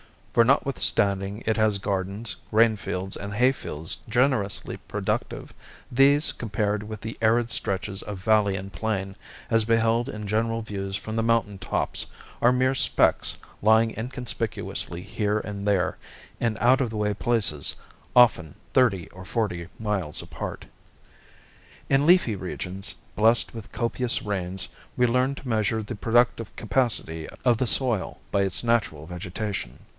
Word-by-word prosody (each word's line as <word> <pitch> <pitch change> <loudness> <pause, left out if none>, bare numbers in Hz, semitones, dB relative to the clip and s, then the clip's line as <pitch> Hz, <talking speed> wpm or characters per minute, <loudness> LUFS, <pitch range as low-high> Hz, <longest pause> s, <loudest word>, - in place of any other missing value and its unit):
For 115 - +5
notwithstanding 105 -6 +1
it 110 0 +1
has 110 -2 +3
gardens, 100 +2 -3 0.2
grainfields, 105 -4 +1
and 100 +1 -6
hayfields 120 - 0
generously 120 -4 +1
productive, - - -3 0.4
these 140 +4 +4
compared 105 -2 -2
with 105 0 -7
the 110 +1 -6
arid 115 +1 +3
stretches 100 -2 -2
of 105 -2 -6
valley 105 -2 +3
and 95 +1 -6
plain, 95 +1 -3 0.3
as 115 -1 +3
beheld 115 +1 +2
in 105 0 -6
general 115 +2 0
views 100 -3 -4
from 110 +2 -4
the - - +2
mountain 115 -3 +1
tops, - - -1 0.4
are 120 +1 +5
mere 130 +1 +2
specks - - +3 0.2
lying 110 +2 +5
inconspicuously 115 -7 -4
here 105 +1 -1
and 100 -1 -5
there, 100 -3 +1 0.4
in 115 -2 0
out 130 +4 +4
of 125 - 0
the 110 - -5
way 105 0 +1
places, 100 -9 0 0.4
often 110 - +5 0.2
thirty 105 -10 +3
or 95 +1 -11
forty 90 -4 -2
miles 100 -8 -1
apart. - - -6 1.2
In 140 +2 +3
leafy 170 - +5
regions, 95 +1 -4 0.2
blessed 115 +2 +3
with 110 -3 -9
copious 120 +1 -1
rains, 95 -2 -3 0.3
we 125 - +3
learn 125 +3 +2
to 135 - -10
measure 110 -1 0
the 105 - -6
productive 115 0 +1
capacity 100 -8 -1 0.2
of 120 -2 +4
the 130 - +1
soil 120 -5 +4
by 100 - +2
its 95 +2 -1
natural 105 -11 0
vegetation. 90 - -5
110 Hz, 140 wpm, -25 LUFS, 100-115 Hz, 1.2 s, For